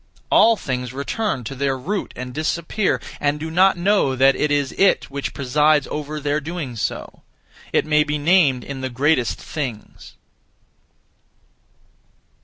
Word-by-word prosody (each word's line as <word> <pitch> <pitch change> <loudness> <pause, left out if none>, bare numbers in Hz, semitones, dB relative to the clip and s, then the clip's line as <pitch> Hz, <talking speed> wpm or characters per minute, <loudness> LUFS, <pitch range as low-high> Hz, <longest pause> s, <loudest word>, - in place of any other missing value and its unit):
All 230 +1 +6
things 125 -6 -4
return 140 - -2
(to 115 - -6
their 135 0 -1
root 195 +10 -3
and 125 0 -6
disappear), 170 - -1 0.2
and 145 0 0
do 160 +1 -5
not 190 +3 +4
know 175 -7 +2
that 135 +1 +4
it 150 - 0
is 145 -2 0
it 195 -7 +2
which 140 0 -4
presides 150 +2 +2
over 150 0 -4
their 145 +1 -1
doing 155 -5 -5
so; 110 - -4 0.5
it - - +2
may 150 0 +3
be 150 0 -2
named 145 -5 +3
in 135 -2 -7
the 130 - -3
greatest 130 -1 +1
things. 125 -9 -7
145 Hz, 145 wpm, -21 LUFS, 130-160 Hz, 0.5 s, All